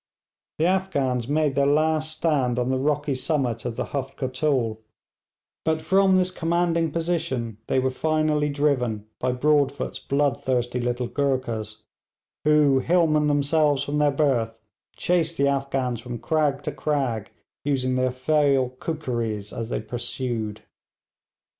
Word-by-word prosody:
The 160 - +2
Afghans 140 -10 0
made 150 0 +1
their 140 +1 +2
last 155 +1 +1
stand 135 -7 +1
on 125 +1 0
the 130 - +1
rocky 145 +1 0
summit 130 -4 -1
of 120 -2 -3
the - - -2
Huft 135 -1 -3
Kotul; 130 -4 0 0.8
but 160 0 +1
from 190 +3 +4
this 185 0 +1
commanding 170 -1 +1
position 160 - -2
they - - +1
were 130 0 +2
finally 155 +1 +1
driven 130 -7 0
by 125 - 0
Broadfoot's 140 +1 +1
bloodthirsty 130 -3 0
little 120 0 -1
Goorkhas, 120 -6 -2 0.6
who, 150 -3 +5
hillmen 155 -1 +3
themselves 145 0 +2
from 145 +1 -1
their 150 0 +4
birth, 125 -6 0 0.4
chased 170 -2 0
the 140 - +3
Afghans 135 -3 -1
from 120 0 -6
crag 145 +1 0
to - - -2
crag, 125 -9 -1 0.3
using 130 -3 0
their 130 0 +2
fell 135 0 +2
kookeries 120 -10 -3
as 115 -1 -4
they - - -2
pursued. 120 -3 -4
140 Hz, 135 wpm, -24 LUFS, 125-155 Hz, 0.8 s, who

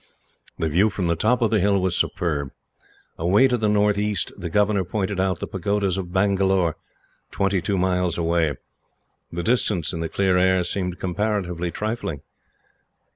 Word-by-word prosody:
The 80 - -1
view 90 +8 +3
from 95 -2 -3
the 85 0 +1
top 115 +8 +1
of 115 - +1
the 110 - +3
hill 100 +1 +2
was 90 -1 0
superb. 75 -5 -1 0.7
Away 95 +10 +4
to 125 - +1
the 110 -3 0
northeast, 105 0 +1
the 90 -3 -6
governor 105 +2 +2
pointed 95 +1 -2
out 95 -2 0
the - - -3
pagodas 100 0 -1
of 90 -2 -5
Bangalore, 95 -3 +2 0.5
twenty 100 -2 0
two 95 +2 -1
miles 90 -2 +1
away; 85 -3 +1 0.8
the 85 +1 -4
distance, 105 -8 0
in 85 - -4
the 80 0 -3
clear 95 -2 +1
air, 95 0 +3
seeming 90 0 -2
comparatively 90 -2 -2
trifling. 105 - -4
95 Hz, 160 wpm, -23 LUFS, 85-105 Hz, 0.8 s, Away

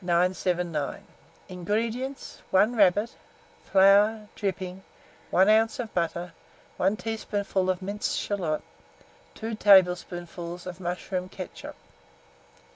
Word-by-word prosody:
979. 175 -3 0 0.4
INGREDIENTS. 225 +9 -3
1 210 +6 +3
rabbit, 205 +1 +3 0.5
flour, 205 +3 +4
dripping, 190 -2 -4 0.5
1 190 +2 +4
oz. 220 +2 +3
of 230 -3 -5
butter, 170 0 -2 0.4
1 195 +3 +1
teaspoonful 205 -4 -2
of 185 0 -1
minced 205 +2 -2
shalot, 175 -7 -2 0.7
2 225 +1 -5
tablespoonfuls 180 -3 +2
of 180 0 -7
mushroom 180 +1 -4
ketchup. 185 -1 -8
190 Hz, 95 wpm, -27 LUFS, 180-210 Hz, 0.7 s, flour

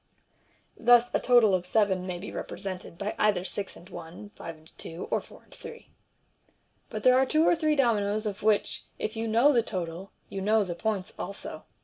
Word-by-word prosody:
(Thus 240 0 +5
a - - +3
total 240 -5 +5
of 185 -1 +1
seven 190 -1 +1
may 180 -1 -3
be 185 - -7
represented 185 -3 -6
by 200 +3 -3
either 200 -4 +2
six 200 0 -4
and 175 - -14
one, 175 +3 -10
five 165 -1 -8
and 155 +1 -21
two, 165 +2 -6
or - - +1
four - - -16
and - - -20
three.) - - -11 1.0
But 215 -1 -5
there 255 0 +6
are 265 - +4
two 315 +3 +3
or - - +5
three 310 -2 +1
dominoes 215 -5 +1
of 205 -2 -4
which, 215 -1 +1
if 215 - -3
you 225 +1 -2
know 235 +7 +5
the 240 - +4
total, 185 -2 -5 0.2
you 195 - -5
know 215 +2 +3
the 180 -3 -4
points 190 +1 -2
also. 200 +2 -6
205 Hz, 200 wpm, -28 LUFS, 185-230 Hz, 1.0 s, there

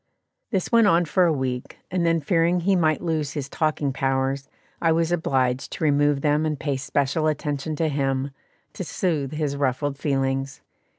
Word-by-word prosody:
This 190 -6 -1
went 230 -2 +5
on 170 -2 +4
for 180 +3 +3
a 170 - +3
week, 130 -4 -3
and 180 -1 0
then 165 -1 +2
fearing 170 +2 +2
he 195 +3 +2
might 155 -3 +2
lose 155 -4 -1
his 145 -3 -4
talking 150 -2 -1
powers, 135 +1 -1 0.3
I 165 - +3
was 165 +1 +1
obliged 130 -6 0
to - - -5
remove 145 -1 +3
them 150 +1 +2
and 155 -3 -1
pay 145 -3 -1
special 145 +3 0
attention 150 0 -2
to 160 +1 0
him, 135 -1 -1 0.4
to - - -5
soothe 155 -4 -1
his 150 -2 -1
ruffled 140 +1 -1
feelings. 135 -1 -1
150 Hz, 175 wpm, -24 LUFS, 135-165 Hz, 0.4 s, went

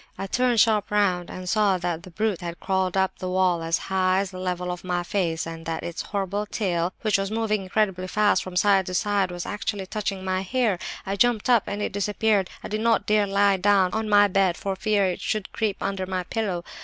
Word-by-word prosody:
I - - -4
turned 245 +3 +1
sharp 215 -2 +3
round 190 -4 +1
and 185 0 -7
saw 205 -1 +3
that 175 -2 -3
the 185 - -12
brute 210 +1 -1
had 170 -1 -6
crawled 190 -1 0
up 190 0 0
the 185 - -3
wall 180 -2 +2
as 165 +1 +1
high 185 0 +1
as 195 -1 -4
the 185 - -8
level 180 -1 -2
of 180 - -6
my 180 -1 -1
face, 175 -4 -1
and 165 0 -7
that 165 -1 -3
its 170 - -4
horrible 200 +1 -3
tail, 180 -4 -1
which 215 -2 +2
was 195 0 -2
moving 215 -1 0
incredibly 190 -1 -1
fast 205 -1 +2
from 185 -1 -8
side 195 0 +3
to 185 - -3
side, 200 0 +1
was 175 -1 -5
actually 205 -1 -3
touching 195 -1 -4
my 185 0 0
hair! 215 -1 0 0.3
I 195 - -2
jumped 240 +2 +2
up—and 205 -3 +1
it - - -3
disappeared. 205 -1 +1
I - - -4
did 215 +1 -3
not 230 0 +2
dare 210 -1 +2
lie 200 0 +3
down 190 -1 +3
on 220 -1 -1
my 205 0 +6
bed 190 -3 +2
for 195 -1 -3
fear 205 0 +1
it 180 -1 -2
should 215 -3 -2
creep 210 -3 -1
under 190 -1 -2
my 185 -1 -2
pillow. 185 -3 -2
195 Hz, 225 wpm, -25 LUFS, 185-210 Hz, 0.3 s, my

